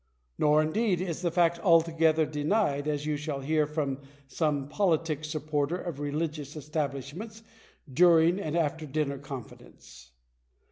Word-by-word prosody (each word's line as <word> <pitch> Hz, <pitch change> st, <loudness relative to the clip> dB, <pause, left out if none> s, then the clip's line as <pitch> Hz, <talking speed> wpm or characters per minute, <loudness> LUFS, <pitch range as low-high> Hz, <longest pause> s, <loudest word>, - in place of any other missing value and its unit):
Nor, 150 Hz, +1 st, +4 dB
indeed, 185 Hz, +3 st, +1 dB
is 175 Hz, -3 st, -3 dB
the 175 Hz, -, +1 dB
fact 170 Hz, 0 st, +2 dB
altogether 165 Hz, -2 st, +3 dB
denied, 150 Hz, 0 st, 0 dB
as 150 Hz, -1 st, -1 dB
you 150 Hz, -1 st, -1 dB
shall 145 Hz, -2 st, -4 dB
hear 150 Hz, +2 st, +1 dB
from 145 Hz, -3 st, -2 dB, 0.3 s
some 145 Hz, -2 st, -1 dB
politic 160 Hz, -3 st, 0 dB
supporter 150 Hz, +1 st, -1 dB
of 170 Hz, -6 st, -6 dB
religious 150 Hz, 0 st, -3 dB
establish 140 Hz, -2 st, -3 dB
ments 220 Hz, +4 st, -9 dB, 0.5 s
during 170 Hz, +2 st, +5 dB
an 155 Hz, -5 st, -3 dB
after 160 Hz, -1 st, -1 dB
dinner 140 Hz, -1 st, -2 dB
confidence. 125 Hz, -, -11 dB
155 Hz, 135 wpm, -28 LUFS, 145-165 Hz, 0.5 s, during